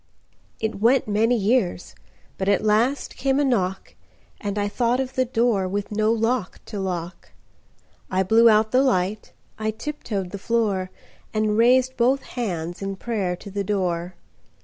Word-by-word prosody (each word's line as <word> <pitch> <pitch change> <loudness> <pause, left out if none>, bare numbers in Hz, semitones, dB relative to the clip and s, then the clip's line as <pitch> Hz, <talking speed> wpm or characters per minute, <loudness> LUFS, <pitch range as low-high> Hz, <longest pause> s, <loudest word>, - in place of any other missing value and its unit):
IT 220 -2 -3
went 245 +2 +4
many 225 +4 +2
years, 205 -4 0 0.5
But 190 +1 0
at 200 +1 +2
last 225 +6 +1
came 270 +1 +1
a - - +3
knock, 195 -7 -1 0.5
And 205 0 -4
I 205 0 0
thought 235 +4 0
of 260 -1 -3
the 255 -1 +1
doorWith 205 -5 0
no 215 +1 +2
lock 225 -2 -1
to 210 - -6
lock.I 185 +1 -6
blew 225 +4 +5
out 215 0 +3
the 255 - +4
light,I 215 -1 -2
tip 280 +8 -5
toed 195 -5 -3
the 200 - -6
floor, 200 -4 0 0.5
And 215 -1 +1
raised 255 +3 +4
both 255 +3 +2
handsIn 195 -4 -4
prayer 200 -6 -2
to 195 +3 -11
the 200 +1 -2
door. 180 -3 -2
215 Hz, 150 wpm, -23 LUFS, 190-240 Hz, 0.5 s, blew